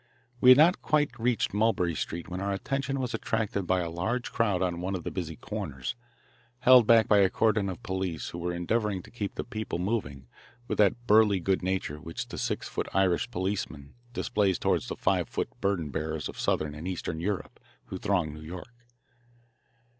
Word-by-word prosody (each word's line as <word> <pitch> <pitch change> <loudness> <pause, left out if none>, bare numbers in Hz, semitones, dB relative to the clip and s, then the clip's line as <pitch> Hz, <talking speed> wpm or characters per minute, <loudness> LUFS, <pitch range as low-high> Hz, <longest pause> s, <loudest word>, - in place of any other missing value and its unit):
We 125 - +6
had 130 - +10
not 165 +5 +5
quite 150 -2 +2
reached 120 -3 +1
Mulberry 105 -5 +2
Street 85 +2 -4
when 90 +1 -5
our 100 0 -1
attention 135 +7 -2
was 125 -2 -2
attracted 105 -4 -1
by 95 +1 +2
a 85 - -3
large 110 +9 -2
crowd 100 -5 +1
on 90 -1 -1
one 95 +2 -2
of 90 - -5
the - - -4
busy 85 -4 -4
corners, 65 -4 -5 0.7
held 125 -3 +7
back 115 -1 +6
by 105 - +5
a 95 -1 +5
cordon 105 -2 +2
of 90 - -7
police 95 -4 -3
who 85 - -7
were 90 +1 -2
endeavouring 95 +2 -1
to - - -15
keep 105 -4 -4
the - - -3
people 110 -6 -4
moving 90 - -2 0.4
with - - -3
that 105 +4 +3
burly 105 -3 +5
good 95 +2 0
nature 90 -5 -2
which 80 +1 -6
the - - -6
six - - -2
foot - - -3
Irish 95 +3 +2
policeman 95 -8 -3 0.2
displays 100 -6 +1
toward - - +1
the - - -5
five - - +1
foot - - -2
burden 90 -7 0
bearers 80 +1 -3
of - - -9
southern 75 -1 0
and 75 +4 -7
eastern 90 -3 -3
Europe 100 +3 -3 0.3
who - - -6
throng 90 -6 0
New 75 - -10
York. 90 +8 -9
95 Hz, 190 wpm, -28 LUFS, 85-110 Hz, 0.7 s, had